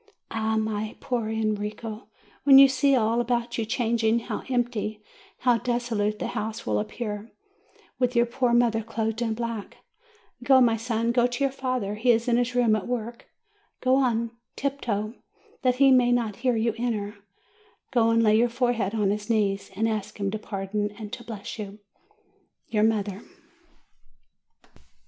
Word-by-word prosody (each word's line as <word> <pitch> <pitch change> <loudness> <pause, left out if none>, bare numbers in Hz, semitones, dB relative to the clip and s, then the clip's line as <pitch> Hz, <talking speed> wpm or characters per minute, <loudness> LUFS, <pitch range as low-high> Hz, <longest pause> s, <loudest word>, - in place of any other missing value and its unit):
Ah, 220 0 0
my 215 0 -2
poor 235 -4 -2
Enrico, 215 0 -3 0.4
when 275 -1 +8
you 275 0 +10
see 270 +1 +3
all 230 0 +2
about 240 0 -1
you 225 - 0
changing, 230 -1 +1
how - - -4
empty, 235 -4 -1 0.4
how 240 -2 +3
desolate 230 -3 -1
the - - -3
house 220 -1 -4
will 105 -1 +1
appear, 210 - -5 0.7
with 250 -1 +1
your 235 0 +5
poor 240 +1 0
mother 235 -2 +3
clothed 225 0 -3
in 225 -2 0
black! 230 -3 -5 0.6
Go, 260 +1 +5
my 235 -3 +4
son, 230 0 -1
go 240 0 +3
to 245 +3 -3
your 275 - +2
father; 255 -6 -2
he 225 +4 -1
is 230 +1 +3
in 240 -1 +3
his 245 0 0
room 235 -3 +4
at 210 - -3
work. 235 -1 -4 0.5
Go 255 0 +2
on 235 -3 +1 0.2
tiptoe, 230 -6 -2
so - - -30 0.4
that 255 -2 +2
he 270 +1 +5
may 250 -1 +5
not 230 -4 0
hear 250 -2 +1
you 225 0 +1
enter; 210 -4 -2 0.7
go 235 -3 +3
and 230 0 +3
lay 215 -1 +5
your 235 +2 +4
fore 245 +1 +1
head 215 -2 -2
on 205 -3 +2
his 210 +1 -4
knees, 200 -3 0
and 220 +3 +1
ask 215 -2 -3
him 200 -1 -1
to 215 - -3
pardon 205 0 -3
and 215 -2 -8
to 240 - -6
bless 220 -1 -7
you. 205 -1 -6 0.9
YOUR 210 - +1
MOTHER. 210 -2 +1
230 Hz, 170 wpm, -26 LUFS, 215-245 Hz, 0.9 s, you